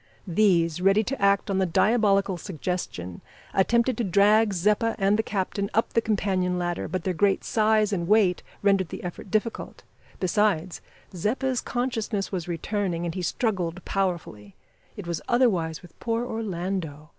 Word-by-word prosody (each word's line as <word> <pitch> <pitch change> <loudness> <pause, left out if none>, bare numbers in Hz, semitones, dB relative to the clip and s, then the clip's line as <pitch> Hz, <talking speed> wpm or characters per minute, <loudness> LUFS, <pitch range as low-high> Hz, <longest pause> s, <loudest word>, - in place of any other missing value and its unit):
These, 175 -3 +2
ready 195 +3 +4
to 270 +3 -4
act 200 0 +2
on 190 - +1
the 190 - +3
diabolical 200 +1 +2
suggestion, 165 - -5 0.3
attempted 235 +5 +2
to - - +1
drag 205 +3 +4
Zeppa 210 +5 +1
and 195 0 +3
the 220 - +2
captain 200 -1 -2
up 225 - +1
the 230 - +3
companion 190 -4 0
ladder, 175 -1 -2
but 185 -2 -3
their 185 - -1
great 195 +3 +2
size 215 -1 +2
and 170 -3 -1
weight 200 -3 +3 0.2
rendered 195 -4 +3
the - - -7
effort 180 +2 -7
difficult. 215 +3 -2 0.4
Besides, 185 -3 0 0.3
Zeppa's 255 +8 -1
consciousness 230 -5 -2
was 180 -4 -3
returning, 175 0 -2
and 170 - -3
he 185 - -4
struggled 185 -3 -2
powerfully. 170 - -3 0.4
It 205 - -7
was 170 -2 -3
otherwise 185 -11 +1
with 175 - -16
poor 230 +1 -1
Orlando. 180 -9 -4
195 Hz, 155 wpm, -25 LUFS, 175-215 Hz, 0.4 s, ready